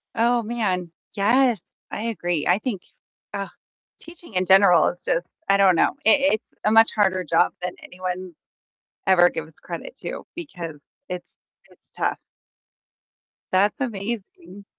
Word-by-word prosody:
Oh, 235 +1 +3
man, 195 -7 -2 0.2
yes, 230 +1 +3 0.3
I 210 - -4
agree, 175 -8 -1
I 180 +4 +4
think, 220 -7 -3 0.5
ugh, 200 -1 -3 0.5
teaching 335 -6 -8
in 185 0 +1
general 190 -3 +6
is 180 - -3
just, 175 +2 -1 0.2
I 195 - +5
don't 195 -2 +5
know, - - +2
it 285 -1 +5
it's 215 - -3
a 215 - +3
much 225 0 +7
harder 190 -3 +2
job 165 +1 +2
than 180 0 -3
anyone 185 0 -5 0.7
ever 175 -2 +6
gives 160 -1 -6
credit - - -7
to, - - -6
because 170 - -7 0.3
it's 180 -1 -7 0.3
it's - - -24
tough. - - 0 1.3
That's 195 +2 +2
amazing. 200 -4 -5
195 Hz, 140 wpm, -23 LUFS, 180-225 Hz, 1.3 s, much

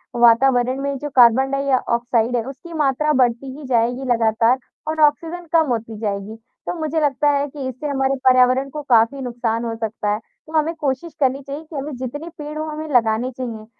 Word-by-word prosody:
वातावरण 245 +2 +4
में 280 -1 -2
जो 295 +2 -5
कार्बन 255 +2 +5
डाइऑक्साइड 245 -3 0
है, 230 - 0
उसकी 305 +6 -9
मात्रा 300 0 +1
बढ़ती 255 +2 0
ही 295 - -9
जाएगी 245 +1 +1
लगातार 230 +2 +3 0.3
और 315 0 -2
ऑक्सीजन 330 +4 +1
कम 320 -2 +4
होती 225 -1 -3
जाएगी। 205 0 -3 0.3
तो - - -2
मुझे 315 +1 -1
लगता 290 0 +2
है 285 0 +1
कि 275 -2 -6
इससे 260 +4 -6
हमारे 270 -1 0
पर्यावरण 255 +1 +4
को 300 +2 -6
काफ़ी 235 +4 +4
नुकसान 235 -2 -2
हो 225 -1 -3
सकता 220 -2 -3
है, 210 - -2
तो 310 +7 -20
हमें 315 +2 +1
कोशिश 295 +1 -3
करनी 270 0 +1
चाहिए 290 +3 -6
कि 315 -1 -12
हमें 280 0 -4
जितने 290 +6 -6
पेड़ 300 0 -6
हों, 310 0 -3
हमें 310 +1 -5
लगाने 230 +2 +2
चाहिए, 235 -4 -6
265 Hz, 190 wpm, -20 LUFS, 235-295 Hz, 0.3 s, कार्बन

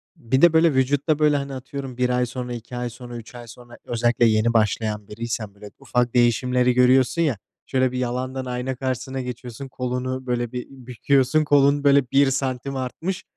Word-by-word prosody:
Bir 130 +4 -1
de 170 -2 +6
böyle 160 -2 +4
vücutta 145 +3 +1
böyle, 150 -1 +3
hani, 140 0 -5
atıyorum 135 -1 -7
1 125 0 +1
ay 125 0 +1
sonra, 125 0 -5
2 120 +1 -8
ay 120 0 -3
sonra, 120 0 -9
3 115 +1 -12
ay 120 -1 -10
sonra 120 +1 -13
özellikle 120 0 +1
yeni 110 +1 +2
başlayan 105 -1 0
biriysen 110 -1 -5
böyle 105 0 -12
ufak 125 -1 -1
değişimleri 125 +1 +2
görüyorsun 130 +5 +3
ya. 140 - +1 0.3
Şöyle 130 -1 +1
bir 130 - -4
yalandan 130 +1 -3
ayna 125 +1 -3
karşısına 130 +1 -3
geçiyorsun, 125 +1 -7
kolunu, 130 0 -4
böyle, 120 -1 -1
bir 125 -1 -5
büküyorsun. 130 +3 +1
Kolun, 145 -1 +3
böyle, 140 -3 +4
1 135 0 +4
santim 135 0 -2
artmış. 160 +9 -4
125 Hz, 180 wpm, -23 LUFS, 120-135 Hz, 0.3 s, de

